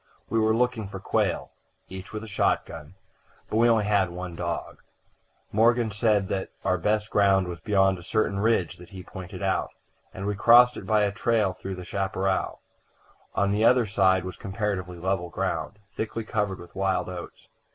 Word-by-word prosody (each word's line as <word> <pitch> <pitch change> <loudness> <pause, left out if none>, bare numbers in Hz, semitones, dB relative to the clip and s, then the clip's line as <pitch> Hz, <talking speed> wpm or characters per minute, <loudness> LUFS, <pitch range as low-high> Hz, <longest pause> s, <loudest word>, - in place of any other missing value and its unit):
We 115 - +2
were 110 0 +3
looking 120 -3 0
for 95 -1 -7
quail, - - -1 0.4
each 95 +1 -9
with 110 0 -5
a - - -8
shotgun, 80 -4 -1 0.6
but 110 - +1
we 120 +1 +5
had 105 -4 +3
only 85 - -10
one 90 -1 -6
dog. 85 0 -4 0.7
Morgan 115 +1 +3
said 105 -2 +2
that 95 -1 -2 0.2
our 90 0 +2
best 105 +4 0
ground 95 -2 +3
was 85 -2 -6
beyond 95 -1 +2
a - - -12
certain 100 0 0
ridge 105 -6 +1
that 90 - -13
he 95 -2 -9
pointed 95 +1 -8
out, 95 -2 0 0.4
and 95 - -6
we 105 - 0
crossed 120 +4 +6
it - - -8
by 110 -1 +3
a 100 - +1
trail 105 -2 +1
through 95 +1 -6
the 90 -1 -8
chaparral. 95 0 -1 0.7
On 100 0 +2
the 105 +2 +1
other 125 0 +5
side 95 -2 +2
was 95 - -6
comparatively 95 -3 -3
level 90 0 -1
ground, 100 - -3 0.2
thickly 115 +1 -3
covered 105 -3 -1
with 85 - -13
wild 95 -1 0
oats. 90 -1 -9
100 Hz, 180 wpm, -26 LUFS, 95-110 Hz, 0.7 s, crossed